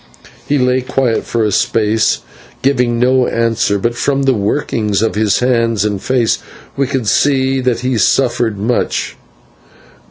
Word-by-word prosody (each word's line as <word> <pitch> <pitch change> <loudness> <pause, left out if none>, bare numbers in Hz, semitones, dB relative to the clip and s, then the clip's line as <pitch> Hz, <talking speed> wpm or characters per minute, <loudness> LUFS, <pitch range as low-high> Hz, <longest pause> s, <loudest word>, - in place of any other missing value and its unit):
He 145 - +1
lay 125 0 +1
quiet 125 -2 -1
for 115 -1 -1
a 105 - 0
space, 110 +2 +1 0.4
giving 125 -3 +1
no 125 +1 +2
answer, 115 -3 0
but 115 +4 -1
from 140 +3 -1
the 135 -1 +3
workings 105 -2 -1
of 110 - 0
his 105 0 +1
hands 115 -4 +1
and 100 -2 -2
face 125 -3 +1 0.4
we 140 -1 0
could 135 -4 -2
see 135 +2 +2
that 125 -2 0
he 125 -2 -1
suffered 120 -1 +1
much. 115 +5 -1
120 Hz, 150 wpm, -15 LUFS, 110-130 Hz, 0.4 s, the